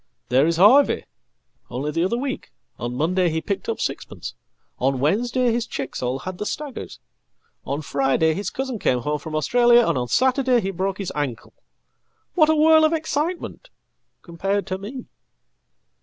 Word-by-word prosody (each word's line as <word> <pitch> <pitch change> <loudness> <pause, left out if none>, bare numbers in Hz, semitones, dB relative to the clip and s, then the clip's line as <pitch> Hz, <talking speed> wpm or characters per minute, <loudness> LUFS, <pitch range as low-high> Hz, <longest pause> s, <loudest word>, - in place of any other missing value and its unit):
There 130 +5 +4
isHarvey. 205 +12 +5 0.7
Only 135 +5 -3
the 165 +2 0
other 195 +6 0
week; 265 +1 -4 0.3
on 120 +1 -4
Monday 175 +5 +1
he 160 0 -1
picked 200 +4 -4
up - - -2
sixpence, - - -4 0.5
on 135 +1 +1
Wednesdayhis 235 - +1
chicks 140 -2 -5
all 125 +1 -1
had 185 +5 -7
the 210 - -3
staggers, 295 -4 -6 0.7
on 145 +3 -3
Friday 140 +3 +1
his 200 +5 -3
cousin 260 -4 -4
came 125 -8 +1
home 150 +4 -2
fromAustralia, 235 - +3
and 160 -6 +1
on 125 - -2
Saturday 255 - +3
he 195 -3 -2
broke 190 +1 -2
his 195 -3 -4
ankle. 145 -5 -4 0.8
What 310 -3 +4
a 315 - +4
whirl 315 +1 +6
ofexcitement! 320 +7 -1 0.6
compared 195 +4 -2
to 185 0 -4
me."" 245 +6 -7
195 Hz, 150 wpm, -23 LUFS, -, 0.8 s, whirl